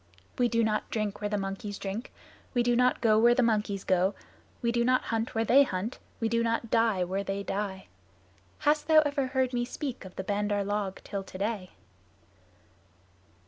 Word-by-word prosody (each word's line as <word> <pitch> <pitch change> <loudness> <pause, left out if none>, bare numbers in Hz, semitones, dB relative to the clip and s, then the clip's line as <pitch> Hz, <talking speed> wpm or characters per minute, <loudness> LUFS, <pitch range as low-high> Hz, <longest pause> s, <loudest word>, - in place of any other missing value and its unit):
We 245 - +4
do 230 -1 +2
not 215 -1 0
drink 215 -2 -2
where 205 - -1
the 210 - 0
monkeys 195 +1 -4
drink; 200 +5 -5 0.4
we 240 - +3
do 240 0 +2
not 250 +1 +3
go 215 -2 +4
where 240 +2 +5
the 255 - +3
monkeys 210 -4 0
go; 185 +1 +2 0.4
we 235 -1 0
do 235 0 +1
not 255 +1 +3
hunt 225 +1 -1
where 225 0 +1
they 265 +5 +6
hunt; 215 -2 -1 0.2
we 225 - +1
do 230 +1 +1
not 230 0 -1
die 225 -5 +3
where 190 +3 -2
they 200 0 -3
die. 195 -1 -3 0.8
Hast 295 +1 +2
thou 315 -1 +7
ever 285 -3 0
heard 260 -1 0
me 240 0 +1
speak 260 +1 -5
of 190 -1 -11
the 190 - -4
Bandar 205 +1 0
log 200 -1 -2
till 200 - -4
today?" 195 0 -4
220 Hz, 185 wpm, -29 LUFS, 200-240 Hz, 0.8 s, thou